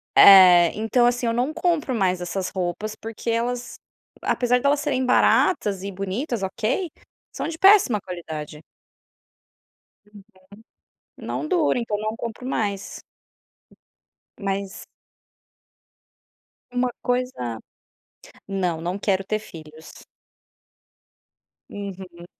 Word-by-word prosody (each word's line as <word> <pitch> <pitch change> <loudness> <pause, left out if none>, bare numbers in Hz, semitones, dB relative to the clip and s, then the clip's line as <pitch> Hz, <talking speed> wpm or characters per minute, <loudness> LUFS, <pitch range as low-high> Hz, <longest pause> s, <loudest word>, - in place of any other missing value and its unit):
eh, 180 -3 +8
então 225 +3 +2
assim, 245 0 +1
eu 230 - +1
não 250 +6 -1
compro 330 -5 0
mais 185 -4 0
essas 185 +1 -3
roupas 190 +3 -4
porque 225 +1 -7
elas 240 +2 -2 0.5
apesar 250 0 +1
delas 285 +2 +2
serem 275 -3 -1
baratas 205 - +2
e 200 - -4
bonitas, 195 - -3
ok, 230 - -2 0.4
são - - -4
de 325 - -6
péssima 385 - +5
qualidade. 160 -5 -8 1.4
Uhum. 210 -1 -15 1.0
Não - - -4
dura 320 -7 +1
então 225 -3 -2
não 215 +1 -3
compro 230 +2 -7
mais. 200 -6 -3 1.4
Mas 195 -1 -4 1.9
uma 250 0 0
coisa 245 - -2 0.9
não, 180 -4 -2
não 175 +4 -3
quero 195 -1 0
ter 215 +2 -1
filhos. 160 -6 -13 1.6
Uhum. 190 -3 -8
210 Hz, 100 wpm, -23 LUFS, 185-245 Hz, 1.9 s, eh